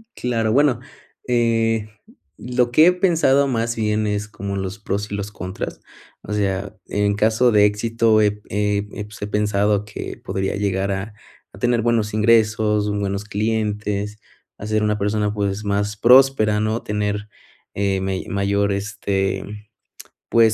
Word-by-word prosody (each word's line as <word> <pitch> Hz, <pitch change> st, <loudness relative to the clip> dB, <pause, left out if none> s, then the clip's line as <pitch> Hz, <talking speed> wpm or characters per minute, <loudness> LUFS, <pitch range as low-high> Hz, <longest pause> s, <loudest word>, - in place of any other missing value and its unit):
Claro. 115 Hz, -3 st, -1 dB
Bueno, 140 Hz, -2 st, +3 dB, 0.5 s
eh, 115 Hz, -3 st, +1 dB, 0.5 s
lo 125 Hz, 0 st, 0 dB
que 155 Hz, +7 st, +6 dB
he 180 Hz, -, +6 dB
pensado 160 Hz, -7 st, +3 dB
más 115 Hz, -2 st, -1 dB
bien 110 Hz, -1 st, 0 dB
es 105 Hz, 0 st, -2 dB
como 100 Hz, -2 st, -5 dB
los 95 Hz, +2 st, -4 dB
pros 105 Hz, 0 st, -3 dB
y -, -, -2 dB
los 100 Hz, 0 st, -4 dB
contras. 95 Hz, -1 st, -6 dB, 0.4 s
O 105 Hz, -, -5 dB
sea, 100 Hz, 0 st, -1 dB
en 100 Hz, 0 st, 0 dB
caso 110 Hz, +4 st, +3 dB
de 105 Hz, -1 st, +5 dB
éxito, 110 Hz, +1 st, +2 dB
eh, 105 Hz, -1 st, +4 dB
pues, 105 Hz, 0 st, -3 dB
eh, 100 Hz, -, -3 dB
pensado 105 Hz, 0 st, +1 dB
que 100 Hz, -, -7 dB
podría 95 Hz, 0 st, -2 dB
llegar 100 Hz, -1 st, -1 dB
a 95 Hz, +3 st, -4 dB, 0.4 s
a -, -, -13 dB
tener 120 Hz, -1 st, +2 dB
buenos 115 Hz, -2 st, +1 dB
ingresos, 105 Hz, -1 st, +3 dB
buenos 100 Hz, 0 st, -2 dB
clientes, 105 Hz, -1 st, -2 dB, 0.4 s
a -, -, -8 dB
ser 110 Hz, 0 st, +1 dB
una 105 Hz, 0 st, +1 dB
persona, 105 Hz, +1 st, 0 dB
pues, 100 Hz, 0 st, -2 dB
más 100 Hz, +1 st, -1 dB
próspera, 120 Hz, -3 st, +5 dB
¿no? 110 Hz, +2 st, -1 dB
Tener, 105 Hz, 0 st, -2 dB, 0.5 s
eh, 100 Hz, -1 st, 0 dB
me 95 Hz, 0 st, -2 dB
mayor, 100 Hz, +1 st, +1 dB
este, 100 Hz, -1 st, -2 dB, 0.8 s
pues, 115 Hz, -2 st, +4 dB
105 Hz, 145 wpm, -21 LUFS, 100-115 Hz, 0.8 s, que